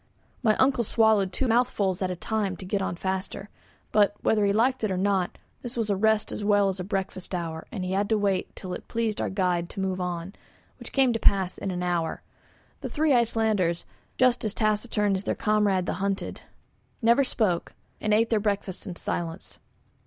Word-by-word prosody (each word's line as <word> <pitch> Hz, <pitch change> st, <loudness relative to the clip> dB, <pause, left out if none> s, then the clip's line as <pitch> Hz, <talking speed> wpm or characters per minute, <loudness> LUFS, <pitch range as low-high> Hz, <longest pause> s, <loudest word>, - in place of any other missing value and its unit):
My 220 Hz, -4 st, +3 dB
uncle 260 Hz, -2 st, +3 dB
swallowed 220 Hz, -3 st, +3 dB
two 260 Hz, +8 st, -1 dB
mouthfuls 225 Hz, -6 st, +1 dB
at 185 Hz, -, 0 dB
a 180 Hz, -, -2 dB
time 200 Hz, 0 st, -2 dB
to 185 Hz, -, -8 dB
get 195 Hz, +2 st, -1 dB
on 185 Hz, -, -2 dB
faster. 190 Hz, +2 st, -4 dB, 0.4 s
But, 205 Hz, -1 st, +4 dB
whether 215 Hz, -1 st, +2 dB
he 200 Hz, -, +3 dB
liked 240 Hz, +4 st, +2 dB
it 215 Hz, -, +1 dB
or 185 Hz, -, -1 dB
not, 190 Hz, -1 st, 0 dB, 0.2 s
this 245 Hz, 0 st, -6 dB
was 220 Hz, -3 st, 0 dB
a -, -, +2 dB
rest 220 Hz, +2 st, +2 dB
as -, -, -4 dB
well 205 Hz, -1 st, +4 dB
as 190 Hz, 0 st, -4 dB
a -, -, -2 dB
breakfast 190 Hz, -1 st, -3 dB
hour 165 Hz, -2 st, -4 dB
and 185 Hz, -4 st, -4 dB
he 185 Hz, -, -3 dB
had 200 Hz, +2 st, 0 dB
to 220 Hz, -, +3 dB
wait 200 Hz, -2 st, -1 dB
till 185 Hz, -2 st, -6 dB
it -, -, -7 dB
pleased 225 Hz, -2 st, -1 dB
our -, -, -1 dB
guide 180 Hz, -3 st, 0 dB
to -, -, -8 dB
move 190 Hz, -1 st, -1 dB
on, 180 Hz, +1 st, -4 dB, 0.5 s
which -, -, -9 dB
came 265 Hz, -3 st, +3 dB
to 225 Hz, -, -1 dB
pass 190 Hz, -3 st, +3 dB
in -, -, -4 dB
an 180 Hz, -1 st, -3 dB
hour. 175 Hz, -2 st, -1 dB, 0.6 s
The -, -, -5 dB
three 305 Hz, -1 st, +2 dB
Icelanders, 220 Hz, -7 st, +1 dB, 0.3 s
just 250 Hz, -1 st, +3 dB
as 215 Hz, -1 st, -1 dB
taciturn 210 Hz, -1 st, +1 dB
as 190 Hz, +2 st, -2 dB
their -, -, 0 dB
comrade 210 Hz, -4 st, +2 dB
the -, -, -1 dB
hunter, 195 Hz, 0 st, -1 dB, 0.7 s
never 235 Hz, +5 st, +5 dB
spoke, 200 Hz, -9 st, 0 dB, 0.3 s
and 215 Hz, -, -1 dB
ate 225 Hz, +2 st, +3 dB
their 220 Hz, -, +3 dB
breakfasts 205 Hz, -2 st, -2 dB
in 180 Hz, -, -5 dB
silence. 170 Hz, +1 st, -5 dB
200 Hz, 205 wpm, -26 LUFS, 185-220 Hz, 0.7 s, never